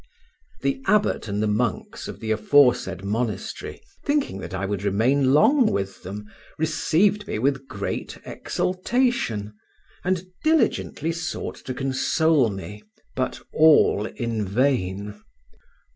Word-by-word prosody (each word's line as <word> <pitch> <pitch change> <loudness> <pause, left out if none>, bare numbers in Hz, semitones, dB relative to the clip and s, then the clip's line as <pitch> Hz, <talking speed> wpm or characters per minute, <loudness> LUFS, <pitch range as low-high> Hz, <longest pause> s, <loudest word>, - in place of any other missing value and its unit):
The 135 -1 0
abbot 210 - +2
and 105 +1 -1
the - - +1
monks 105 +2 -2
of - - -8
the 110 -1 -3
aforesaid 110 -5 +3
monastery, 105 -1 -3 0.2
thinking 285 - 0
that - - -7
I 95 +1 -2
would 100 -1 -2
remain 125 +7 +2
long 240 - +5
with 95 -1 -3
them, 100 +3 -7 0.3
received 170 +6 +1
me - - -2
with 135 +3 0
great 100 -1 -4
exultation, 185 - -1 0.5
and 185 -1 0 0.2
diligently 310 - +1
sought 165 -1 -4
to 130 - -4
console 135 +1 +2
me, 100 +1 -7 0.3
but - - -2
all 155 -9 +5
in 115 -4 -3
vain. 105 -3 -1
125 Hz, 120 wpm, -24 LUFS, 105-160 Hz, 0.5 s, long